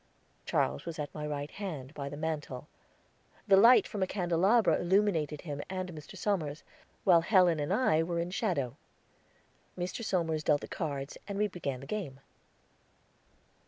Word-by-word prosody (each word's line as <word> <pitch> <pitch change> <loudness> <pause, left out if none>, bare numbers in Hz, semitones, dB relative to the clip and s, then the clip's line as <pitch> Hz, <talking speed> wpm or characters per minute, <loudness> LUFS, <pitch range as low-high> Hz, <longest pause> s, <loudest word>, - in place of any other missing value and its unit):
Charles - - 0
was 165 - -5
at 150 -2 -5
my 150 -1 -4
right 145 0 -4
hand, 155 -9 -6
by 140 -2 -5
the 145 - -7
mantel; 150 -4 -4 0.8
the 195 - +7
light 230 +6 +7
from 205 - -5
a 185 - +2
candelabra 180 +1 +3
illuminated 175 -5 +1
him 145 -4 -5
and 185 -1 -4
Mr. 150 -2 -10
Somers, 165 -8 -1 0.4
while 175 -3 +6
Helen 180 -3 +4
and 145 +3 -2
I 195 -7 +3
were 170 +1 -2
in 170 +1 -2
shadow. 150 - -1 1.0
Mr. 180 +6 -3
Somers 165 -6 0
dealt 150 -1 +3
the - - -7
cards, 140 -4 -4
and 200 -1 -4
we 210 +1 +2
began 140 -9 -4
the - - -9
game. 155 -8 -4
165 Hz, 160 wpm, -31 LUFS, 145-190 Hz, 1.0 s, the